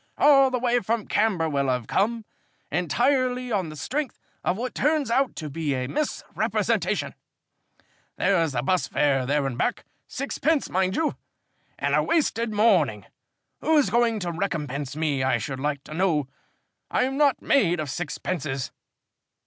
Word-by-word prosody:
"All 275 Hz, -2 st, +6 dB
the 255 Hz, -, 0 dB
way 245 Hz, 0 st, +2 dB
from 225 Hz, 0 st, -1 dB
Camberwell 165 Hz, -10 st, +1 dB
I've 125 Hz, -2 st, 0 dB
come, 225 Hz, -, 0 dB, 0.5 s
entirely 250 Hz, -, +1 dB
on 190 Hz, -6 st, 0 dB
the 155 Hz, -, -8 dB
strength 275 Hz, -, -3 dB, 0.2 s
of 180 Hz, -, 0 dB
what 250 Hz, +3 st, -3 dB
turns 295 Hz, -3 st, +1 dB
out 265 Hz, +2 st, +2 dB
to 155 Hz, -, -5 dB
be 150 Hz, -1 st, -2 dB
a 130 Hz, 0 st, -2 dB
misrepresentation. 300 Hz, -, -1 dB, 1.0 s
There's 165 Hz, -7 st, +2 dB
the 120 Hz, -1 st, -1 dB
bus 185 Hz, +5 st, +1 dB
fare 135 Hz, -3 st, +1 dB
there 145 Hz, 0 st, +1 dB
and 130 Hz, -2 st, -3 dB
back -, -, -1 dB, 0.2 s
six 275 Hz, +2 st, -5 dB
pence, 315 Hz, -1 st, +1 dB
mind 185 Hz, +1 st, +1 dB
you 320 Hz, -2 st, 0 dB, 0.6 s
and -, -, -1 dB
a -, -, +4 dB
wasted 235 Hz, -9 st, +1 dB
morning. 180 Hz, -, +3 dB, 0.5 s
Who's 295 Hz, -10 st, +3 dB
going 235 Hz, -1 st, +3 dB
to 175 Hz, -1 st, -2 dB
recompense 150 Hz, -6 st, -3 dB
me, 150 Hz, -4 st, 0 dB
I 130 Hz, -2 st, +2 dB
should 130 Hz, +4 st, -5 dB
like 140 Hz, 0 st, -2 dB
to -, -, -10 dB
know? 160 Hz, -5 st, +1 dB, 0.6 s
I'm 260 Hz, +1 st, 0 dB
not 285 Hz, -1 st, +3 dB
made 180 Hz, -, +3 dB
of 150 Hz, -3 st, -3 dB
sixpences." 150 Hz, -4 st, -3 dB
185 Hz, 150 wpm, -25 LUFS, -, 1.0 s, All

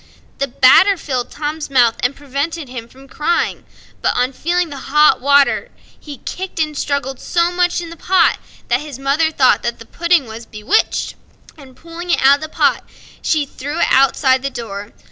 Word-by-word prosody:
The 275 Hz, -, 0 dB
batter 275 Hz, +10 st, +5 dB
filled 255 Hz, -6 st, -3 dB
Tom's 300 Hz, +1 st, -5 dB
mouth, 245 Hz, -4 st, +4 dB
and 250 Hz, +3 st, 0 dB
prevented 285 Hz, +3 st, -4 dB
him 240 Hz, -2 st, -7 dB
from 265 Hz, +3 st, -17 dB
crying; 305 Hz, +5 st, -1 dB, 0.4 s
but, -, -, +1 dB
upon 250 Hz, +2 st, 0 dB
feeling 345 Hz, +4 st, -1 dB
the 280 Hz, -, -7 dB
hot 300 Hz, -1 st, +4 dB
water, 280 Hz, +1 st, +3 dB, 0.3 s
he 290 Hz, -2 st, -10 dB
kicked 375 Hz, +4 st, -6 dB
and 305 Hz, -1 st, -1 dB
struggled 275 Hz, -2 st, -2 dB
so 345 Hz, 0 st, 0 dB
much 355 Hz, 0 st, 0 dB
in 335 Hz, -1 st, -8 dB
the -, -, -8 dB
pot 370 Hz, +3 st, +2 dB, 0.3 s
that -, -, +1 dB
his 295 Hz, -4 st, -8 dB
mother 280 Hz, +4 st, +1 dB
thought 270 Hz, -5 st, +3 dB
that 235 Hz, 0 st, -3 dB
the 230 Hz, -, -12 dB
pudding 340 Hz, +1 st, +1 dB
was 225 Hz, +1 st, -10 dB
bewitched, 215 Hz, -, 0 dB, 0.4 s
and, 270 Hz, -4 st, -15 dB
pulling 335 Hz, +3 st, -10 dB
it -, -, +2 dB
out 275 Hz, +1 st, +6 dB
of -, -, -19 dB
the 310 Hz, -, -6 dB
pot, -, -, +1 dB, 0.4 s
she 305 Hz, -3 st, +1 dB
threw 285 Hz, +3 st, -6 dB
it -, -, +3 dB
outside 265 Hz, -1 st, +3 dB
the 275 Hz, -, -2 dB
door. 205 Hz, -5 st, -7 dB
280 Hz, 185 wpm, -17 LUFS, 260-330 Hz, 0.4 s, out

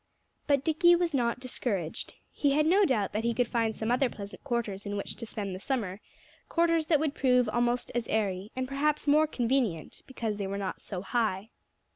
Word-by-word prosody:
But 280 Hz, -2 st, +3 dB
Dickie 345 Hz, +2 st, +5 dB
was 345 Hz, -2 st, 0 dB
not 240 Hz, -3 st, +1 dB
discouraged. 210 Hz, -9 st, -3 dB, 0.2 s
He 285 Hz, -2 st, +1 dB
had 305 Hz, +1 st, +3 dB
no 385 Hz, +5 st, +5 dB
doubt 210 Hz, -, 0 dB
that 215 Hz, +2 st, -1 dB
he 235 Hz, 0 st, 0 dB
could 245 Hz, 0 st, +2 dB
find 225 Hz, -2 st, 0 dB
some 220 Hz, +1 st, -2 dB
other 250 Hz, +1 st, +3 dB
pleasant 200 Hz, -2 st, -9 dB
quarters 235 Hz, -7 st, -2 dB
in 205 Hz, 0 st, -3 dB
which 200 Hz, -, -4 dB
to 230 Hz, -, -6 dB
spend 200 Hz, -3 st, -4 dB
the 185 Hz, -, -6 dB
summer 210 Hz, -5 st, -2 dB, 0.5 s
quarters 335 Hz, -2 st, +2 dB
that 310 Hz, -4 st, +4 dB
would 305 Hz, -2 st, 0 dB
prove 250 Hz, -4 st, +3 dB
almost 240 Hz, +2 st, 0 dB
as 240 Hz, -1 st, -1 dB
airy, 200 Hz, -1 st, -1 dB
and 260 Hz, 0 st, -2 dB
perhaps 295 Hz, +3 st, 0 dB
more 305 Hz, +2 st, +5 dB
convenient 240 Hz, -, -1 dB
because 225 Hz, -5 st, -3 dB
they 200 Hz, -, -2 dB
were 200 Hz, +1 st, -3 dB
not 195 Hz, -2 st, -4 dB
so 185 Hz, -3 st, -6 dB
high. 215 Hz, -2 st, -1 dB
240 Hz, 200 wpm, -29 LUFS, 205-280 Hz, 0.5 s, Dickie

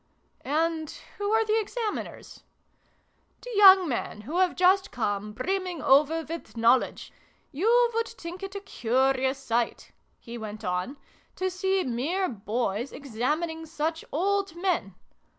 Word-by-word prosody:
" -, -, -40 dB, 0.2 s
And 320 Hz, -2 st, -2 dB, 0.3 s
who 410 Hz, 0 st, -1 dB
are 445 Hz, 0 st, +3 dB
the 435 Hz, +1 st, +2 dB
Examiners? 440 Hz, 0 st, -5 dB, 0.3 s
" -, -, -40 dB
" -, -, -42 dB
The -, -, -7 dB
young 385 Hz, -3 st, +8 dB
men 235 Hz, -5 st, -3 dB
who 300 Hz, -, -3 dB
have 370 Hz, -2 st, +2 dB
just 375 Hz, +2 st, +4 dB
come, 210 Hz, -3 st, -2 dB
brimming 365 Hz, -, -2 dB
over 305 Hz, +4 st, +4 dB
with 325 Hz, -6 st, -8 dB
knowledge. 235 Hz, +3 st, +2 dB, 0.4 s
You 465 Hz, -, +3 dB
would 460 Hz, 0 st, 0 dB
think 360 Hz, -5 st, -9 dB
it 390 Hz, 0 st, -7 dB
a 400 Hz, -, -4 dB
curious 265 Hz, -, +1 dB
sight," 240 Hz, -3 st, -2 dB, 0.3 s
he 235 Hz, 0 st, -9 dB
went 215 Hz, 0 st, -7 dB
on, 180 Hz, +10 st, -2 dB, 0.2 s
" -, -, -35 dB
to 375 Hz, 0 st, -1 dB
see 380 Hz, +1 st, 0 dB
mere 295 Hz, +11 st, -1 dB
boys 225 Hz, -, -2 dB
examining 300 Hz, +6 st, -3 dB
such 320 Hz, +1 st, -2 dB
old 390 Hz, +3 st, 0 dB
men. 345 Hz, -, -1 dB
320 Hz, 150 wpm, -27 LUFS, 245-380 Hz, 0.4 s, young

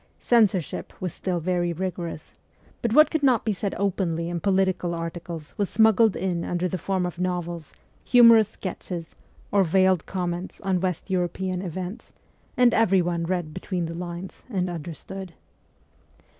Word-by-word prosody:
Censorship 210 Hz, -8 st, +1 dB
was 180 Hz, -3 st, -3 dB
still 180 Hz, -2 st, -2 dB
very 175 Hz, 0 st, 0 dB
rigorous; 170 Hz, -3 st, -5 dB, 0.5 s
but 235 Hz, -, 0 dB
what 305 Hz, +6 st, +6 dB
could 315 Hz, -, 0 dB
not 255 Hz, -7 st, +3 dB
be 215 Hz, -, +1 dB
said 200 Hz, +1 st, -3 dB
openly 175 Hz, -4 st, -1 dB
in 175 Hz, -1 st, -2 dB
political 185 Hz, -1 st, +1 dB
articles 165 Hz, -2 st, -6 dB
was 200 Hz, -, +1 dB
smuggled 220 Hz, -1 st, +4 dB
in 175 Hz, -2 st, -1 dB
under 175 Hz, +1 st, -1 dB
the 180 Hz, +1 st, -3 dB
form 190 Hz, 0 st, -1 dB
of 175 Hz, -1 st, -5 dB
novels, 175 Hz, -3 st, -3 dB, 0.3 s
humorous 230 Hz, -3 st, +7 dB
sketches, 180 Hz, -4 st, -6 dB, 0.4 s
or 200 Hz, -1 st, +4 dB
veiled 185 Hz, 0 st, +3 dB
com 180 Hz, -2 st, -2 dB
ments 175 Hz, +2 st, -6 dB
on 190 Hz, -2 st, +1 dB
West 185 Hz, +1 st, -2 dB
European 185 Hz, 0 st, -1 dB
events, 185 Hz, +3 st, -6 dB, 0.4 s
and 245 Hz, -1 st, +5 dB
everyone 175 Hz, -6 st, +2 dB
read 175 Hz, -3 st, -2 dB
between 180 Hz, 0 st, -3 dB
the 165 Hz, -, -5 dB
lines 175 Hz, +2 st, -7 dB
and 185 Hz, -5 st, -1 dB
understood. 175 Hz, +2 st, -7 dB
180 Hz, 150 wpm, -25 LUFS, 170-195 Hz, 0.5 s, humorous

